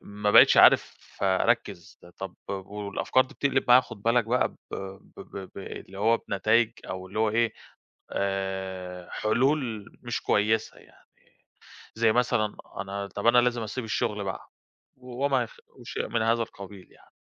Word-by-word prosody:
ما 105 Hz, 0 st, -2 dB
بقيتش -, -, +8 dB
عارف -, -, +6 dB, 0.2 s
أركّز 95 Hz, -2 st, 0 dB, 0.2 s
طب 95 Hz, -2 st, -7 dB
والأفكار 100 Hz, +5 st, -1 dB
دي -, -, -16 dB
بتقلب 135 Hz, -2 st, +1 dB
معايا 125 Hz, +1 st, +8 dB
خد 115 Hz, -5 st, -12 dB
بالك 115 Hz, 0 st, +3 dB
بقى 125 Hz, +3 st, +1 dB
ب -, -, -20 dB, 0.2 s
ب 95 Hz, 0 st, -8 dB
ب 95 Hz, -1 st, -9 dB
ب -, -, -8 dB
اللي 95 Hz, 0 st, -9 dB
هو 115 Hz, +3 st, +3 dB
بنتايج 110 Hz, +3 st, +2 dB, 0.2 s
أو 95 Hz, 0 st, -5 dB
اللي 100 Hz, -, -6 dB
هو 110 Hz, -1 st, +2 dB
إيه 115 Hz, 0 st, +1 dB, 0.6 s
آآ 95 Hz, -2 st, -3 dB
حلول 120 Hz, -2 st, 0 dB, 0.2 s
مش 120 Hz, -1 st, -3 dB
كويسة 110 Hz, +1 st, +1 dB
يعني، -, -, -22 dB, 0.9 s
زي 115 Hz, -1 st, +3 dB
مثلًا 110 Hz, -4 st, +1 dB, 0.2 s
أنا 100 Hz, +1 st, -5 dB
طب 100 Hz, +4 st, -3 dB
أنا 120 Hz, -, +6 dB
لازم 120 Hz, -1 st, +1 dB
أسيب 115 Hz, +4 st, -4 dB
الشغل 105 Hz, -2 st, -2 dB
بقى 95 Hz, -2 st, -6 dB, 0.5 s
وما 130 Hz, +1 st, -1 dB
يخ 115 Hz, -, -12 dB
وشيء -, -, -6 dB
من 115 Hz, -, 0 dB
هذا 115 Hz, +1 st, +2 dB
القبيل 100 Hz, -3 st, -11 dB
يعني. -, -, -23 dB
105 Hz, 155 wpm, -27 LUFS, 95-120 Hz, 0.9 s, بقيتش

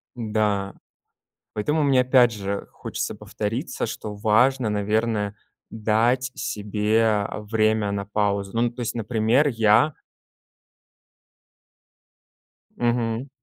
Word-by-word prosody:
М-да. 105 Hz, -4 st, -1 dB, 0.8 s
Поэтому 150 Hz, +9 st, 0 dB
мне 135 Hz, -3 st, +4 dB
опять 125 Hz, -2 st, +5 dB
же 100 Hz, -1 st, -4 dB
хочется -, -, -5 dB
повториться, 115 Hz, +9 st, -4 dB
что 105 Hz, -1 st, -6 dB
важно, 120 Hz, +4 st, +2 dB
наверное, 105 Hz, 0 st, 0 dB, 0.3 s
дать 115 Hz, +4 st, +1 dB
себе, 105 Hz, +2 st, 0 dB
а, 105 Hz, -1 st, 0 dB
время 110 Hz, -1 st, +1 dB
на 100 Hz, 0 st, -3 dB
паузу. 100 Hz, -1 st, -1 dB
Ну 115 Hz, -, 0 dB
ну, 120 Hz, -, 0 dB
то 120 Hz, +1 st, -8 dB
есть, 120 Hz, -, -3 dB
например, 115 Hz, +5 st, +2 dB
я 115 Hz, +4 st, +3 dB, 2.8 s
Мгм. 120 Hz, +1 st, 0 dB
110 Hz, 105 wpm, -24 LUFS, 105-120 Hz, 2.8 s, опять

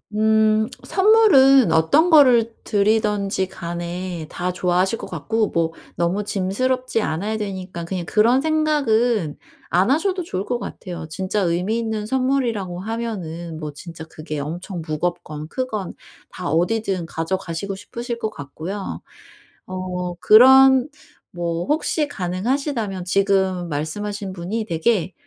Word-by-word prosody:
음 220 Hz, 0 st, +3 dB, 0.2 s
선물은 280 Hz, -, +5 dB
어떤 165 Hz, -, +4 dB
거를 245 Hz, -7 st, +5 dB
드리든지 205 Hz, -2 st, +1 dB
간에 175 Hz, -1 st, -5 dB
다 180 Hz, +1 st, -3 dB
좋아하실 180 Hz, +4 st, +1 dB
것 -, -, -7 dB
같고 215 Hz, +6 st, -1 dB
뭐 165 Hz, -1 st, 0 dB, 0.3 s
너무 180 Hz, +4 st, 0 dB
짐스럽지 225 Hz, +5 st, -1 dB
않아야 205 Hz, +7 st, -2 dB
되니까 185 Hz, -4 st, -5 dB
그냥 180 Hz, -1 st, -4 dB
그런 235 Hz, +5 st, +3 dB
생각은 245 Hz, -, +1 dB, 0.3 s
안 185 Hz, +7 st, +2 dB
하셔도 365 Hz, +4 st, +1 dB
좋을 195 Hz, -, -4 dB
것 245 Hz, -, -1 dB
같아요. 175 Hz, -8 st, -7 dB
진짜 190 Hz, +4 st, -2 dB
의미 180 Hz, +6 st, 0 dB
있는 220 Hz, -2 st, -3 dB
선물이라고 245 Hz, -9 st, -1 dB
하면은 180 Hz, -7 st, -5 dB
뭐 150 Hz, -2 st, -5 dB
진짜 165 Hz, +1 st, -9 dB
그게 155 Hz, -1 st, -7 dB
엄청 170 Hz, +4 st, -5 dB
무겁건 155 Hz, -1 st, -3 dB
크건 215 Hz, -5 st, -4 dB, 0.4 s
다 180 Hz, -4 st, -5 dB
어디든 185 Hz, +2 st, 0 dB
가져가시고 175 Hz, +3 st, -3 dB
싶으실 235 Hz, +4 st, -6 dB
것 220 Hz, -, -2 dB
같고요. 170 Hz, +8 st, -6 dB, 0.7 s
어 180 Hz, -1 st, -4 dB
그런 265 Hz, -, +7 dB, 0.4 s
뭐 170 Hz, -1 st, -3 dB
혹시 300 Hz, 0 st, 0 dB
가능하시다면 205 Hz, -, -2 dB
지금 190 Hz, -2 st, +1 dB
말씀하신 195 Hz, +7 st, -4 dB
분이 195 Hz, +6 st, -3 dB
되게 180 Hz, +2 st, 0 dB
195 Hz, 275 characters per minute, -21 LUFS, 175-230 Hz, 0.7 s, 그런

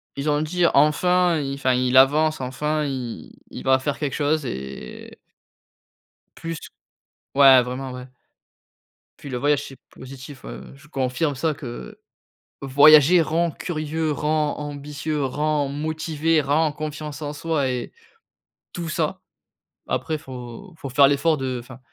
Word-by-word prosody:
ils 140 Hz, +2 st, -2 dB
ont 145 Hz, 0 st, +2 dB
dit: 175 Hz, +3 st, 0 dB
«Enfin 175 Hz, +4 st, +3 dB
il 140 Hz, -2 st, -3 dB
enfin 130 Hz, -2 st, +1 dB
il 125 Hz, 0 st, +1 dB
avance, 150 Hz, +3 st, +4 dB
enfin 150 Hz, +4 st, -2 dB
i 125 Hz, -4 st, -6 dB, 0.2 s
il -, -, -8 dB
va 130 Hz, 0 st, +4 dB
faire 140 Hz, +2 st, -3 dB
quelque 145 Hz, -3 st, -2 dB
chose 150 Hz, 0 st, 0 dB
et» 65 Hz, -, -7 dB, 1.2 s
Plus 165 Hz, -1 st, -5 dB, 0.8 s
ouais, 135 Hz, -2 st, +8 dB
vraiment 130 Hz, +2 st, -5 dB
ouais. 125 Hz, 0 st, -8 dB, 1.1 s
Puis 140 Hz, -, -9 dB
le 125 Hz, -, -3 dB
voyage 145 Hz, +2 st, +1 dB
c'est 135 Hz, -, -12 dB
positif, 135 Hz, +1 st, -11 dB
heu, -, -, -9 dB
je 140 Hz, +2 st, -18 dB
confirme 135 Hz, +2 st, -1 dB
ça, 155 Hz, +4 st, 0 dB
que 120 Hz, -, -9 dB, 0.6 s
voyager 150 Hz, +5 st, +7 dB
rend 165 Hz, +1 st, 0 dB
curieux, 155 Hz, 0 st, -3 dB
rend 150 Hz, 0 st, 0 dB
ambitieux, 145 Hz, +1 st, -4 dB
rend 145 Hz, +1 st, 0 dB
motivé, 155 Hz, +2 st, 0 dB
rend 150 Hz, +3 st, +1 dB
confiance 150 Hz, 0 st, -6 dB
en 145 Hz, -1 st, -4 dB
soi 150 Hz, -3 st, -1 dB
et 125 Hz, -1 st, -4 dB, 0.8 s
tout 170 Hz, -2 st, -5 dB
ça. 155 Hz, -, -2 dB, 0.7 s
Après 155 Hz, -1 st, -2 dB
faut 130 Hz, -, -10 dB
faut 140 Hz, -, -7 dB
faire 135 Hz, +2 st, +6 dB
l'effort 150 Hz, +3 st, +2 dB
de 130 Hz, -2 st, -3 dB
enfin, 130 Hz, +1 st, -13 dB
145 Hz, 140 wpm, -23 LUFS, 130-155 Hz, 1.2 s, ouais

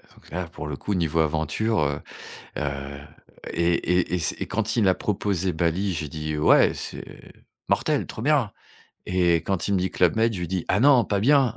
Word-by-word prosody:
Donc -, -, -19 dB
là, 90 Hz, +1 st, -3 dB
pour 80 Hz, -2 st, -8 dB
le 75 Hz, -, -4 dB
coup, 105 Hz, -, -3 dB
niveau 85 Hz, -3 st, 0 dB
aventure, 80 Hz, +8 st, 0 dB
heu 75 Hz, -1 st, 0 dB, 0.6 s
heu 70 Hz, -1 st, -4 dB, 0.5 s
et 85 Hz, 0 st, +2 dB, 0.3 s
et 90 Hz, -, -4 dB
et -, -, +1 dB
c'est 85 Hz, -, -2 dB
et -, -, -2 dB
quand 110 Hz, +3 st, -1 dB
il 105 Hz, -5 st, +3 dB
a 95 Hz, -, +4 dB
proposé 95 Hz, -3 st, -1 dB
Bali, 85 Hz, +4 st, 0 dB
j'ai 80 Hz, -3 st, -4 dB
dit: 75 Hz, +1 st, -4 dB
«Heu 75 Hz, -, -2 dB
ouais, -, -, +5 dB
c'est -, -, -6 dB, 0.6 s
mortel, -, -, +1 dB
trop 110 Hz, -, -7 dB
bien!» 140 Hz, -5 st, +2 dB, 0.6 s
et 90 Hz, -2 st, +3 dB
quand 95 Hz, -2 st, -1 dB
il 100 Hz, -, +2 dB
me 95 Hz, -, +2 dB
dit: 95 Hz, +1 st, -1 dB
«Club 90 Hz, +1 st, +2 dB
Med», 115 Hz, 0 st, +2 dB
je 90 Hz, -, -5 dB
lui 85 Hz, -, -3 dB
dis: 90 Hz, -1 st, -2 dB
«Ah 95 Hz, -, +2 dB
non, 130 Hz, -2 st, +6 dB
pas 100 Hz, -1 st, -1 dB
bien!». 135 Hz, 0 st, +4 dB
90 Hz, 215 wpm, -24 LUFS, 80-105 Hz, 0.6 s, non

